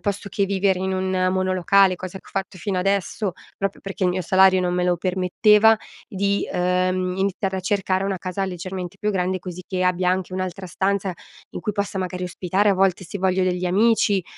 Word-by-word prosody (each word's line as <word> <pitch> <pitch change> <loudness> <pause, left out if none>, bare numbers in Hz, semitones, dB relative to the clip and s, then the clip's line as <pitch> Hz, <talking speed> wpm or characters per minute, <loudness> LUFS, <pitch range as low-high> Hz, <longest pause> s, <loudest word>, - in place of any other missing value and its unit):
posto 200 -1 -3
che 200 - 0
vivere 195 -1 +1
in 190 0 -1
un 185 0 0
monolocale, 185 +1 +3
cosa 185 +1 -7
che - - -22
ho - - -15
fatto 195 -1 -4
fino 190 0 -2
adesso, 195 +1 0 0.2
proprio 195 0 -3
perché 195 0 -6
il 180 - +3
mio 185 - -1
salario 190 +1 +5
non 180 0 0
me 180 - 0
lo 175 -1 +2
permetteva, 205 +5 +4 0.3
di, 200 0 0
uhm, 185 0 0
iniziare 195 0 -1
a - - -2
cercare 190 0 0
una 195 -2 -2
casa 185 +2 -3
leggermente 185 0 -5
più 210 - 0
grande, 185 0 0
così 180 0 -8
che 185 -1 -2
abbia 180 0 +2
anche 185 0 -2
un'altra 185 0 -4
stanza 195 +1 -1 0.4
in - - -4
cui 210 - -2
possa, 200 -1 -2
magari, 185 0 -3
ospitare, 185 +3 +1
a 195 - +3
volte, 190 0 +1
se 195 +4 -6
voglio 185 0 +1
degli 180 0 -1
amici, 205 0 +3
185 Hz, 200 wpm, -22 LUFS, 180-195 Hz, 0.4 s, salario